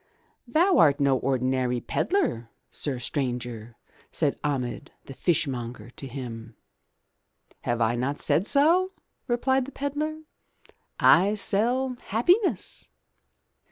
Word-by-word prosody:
"Thou 345 +8 +3
art 145 -2 +5
no 140 -1 +3
ordinary 130 -1 0
pedlar, 265 - -1 0.2
sir 140 -4 -2
stranger,*' 120 -4 -2 0.4
said - - 0
Ahmed, 125 -6 -3
the 135 - -9
fishmonger, 125 -8 -2
to 135 - -8
him. 120 -4 -8 1.1
"Have 120 0 0
I 115 +1 +2
not 130 +4 -2
said 185 +6 +1
so?*' 345 +7 +3 0.3
replied 260 +1 +1
the 275 - -9
pedlar. 300 +3 -3 0.8
"I 195 +5 +5
sell 245 +6 +1
happiness." 355 - +1
145 Hz, 105 wpm, -26 LUFS, -, 1.1 s, art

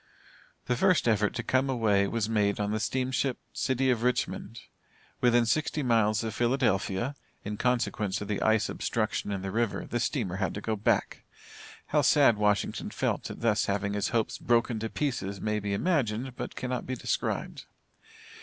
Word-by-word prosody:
The 125 - +1
first 180 +1 +3
effort 105 -2 +2
to - - -2
come 130 +1 +1
away 105 -6 +2
was 115 0 -1
made 105 -2 +1
on 105 0 -1
the 110 - 0
steamship 130 +3 -1 0.2
City 130 0 +1
of 120 -2 0
Richmond. 115 -2 -1 0.6
Within 120 -1 +4
sixty 150 +5 0
miles 110 -3 +2
of 110 -2 -3
Philadelphia, 120 -1 +1 0.3
in 105 +1 -3
consequence 115 -4 0
of 105 - -6
the 105 -1 -2
ice 110 -2 +3
obstruction - - -2
in 95 -1 -3
the 95 - -3
river, 115 -1 -1
the 120 - -2
steamer 110 - -1
had 95 -1 -1
to - - -3
go 110 +1 -1
back. 105 - 0 0.6
How 150 - +2
sad 135 -4 +5
Washington 105 -1 0
felt - - -2
at - - -8
thus 110 -2 +2
having 100 0 -1
his 105 -1 0
hopes 115 -2 -1
broken 120 -1 +1
to 110 +1 -3
pieces 105 -10 -2
may 105 +1 -1
be 100 -1 -3
imagined 125 - 0
but - - -6
cannot 125 -1 -3
be 130 - -2
described. - - -3
115 Hz, 175 wpm, -28 LUFS, 105-125 Hz, 0.6 s, sad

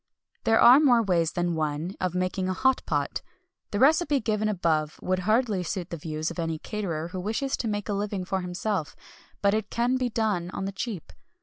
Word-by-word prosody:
There 225 0 +4
are 250 +4 +9
more 245 -6 +5
ways 170 -4 +1
than 175 -1 0
one 155 +2 -2
of 185 -1 -1
making 185 +1 -1
a 185 - -1
"hot 265 +4 +2
pot." - - -1 0.5
The 205 - -2
recipe 290 +3 +4
given 215 -2 0
above 160 -6 0
would 185 0 -1
hardly 220 -4 +2
suit 180 0 -4
the - - -2
views 155 +1 -3
of 170 - -7
any 165 -1 -1
caterer 170 -3 -4
who 185 +1 -5
wishes 225 +8 -1
to 235 - -3
make 205 -1 -2
a 210 - -1
living 200 -2 -2
for 190 0 -1
himself; 180 -1 -3 0.5
but 200 0 +4
it 215 -1 -1
can 245 +2 +1
be 255 -1 0
done 210 -7 -1
on 190 - -3
the 195 - -2
cheap. 200 -3 -5
195 Hz, 205 wpm, -27 LUFS, 175-225 Hz, 0.5 s, are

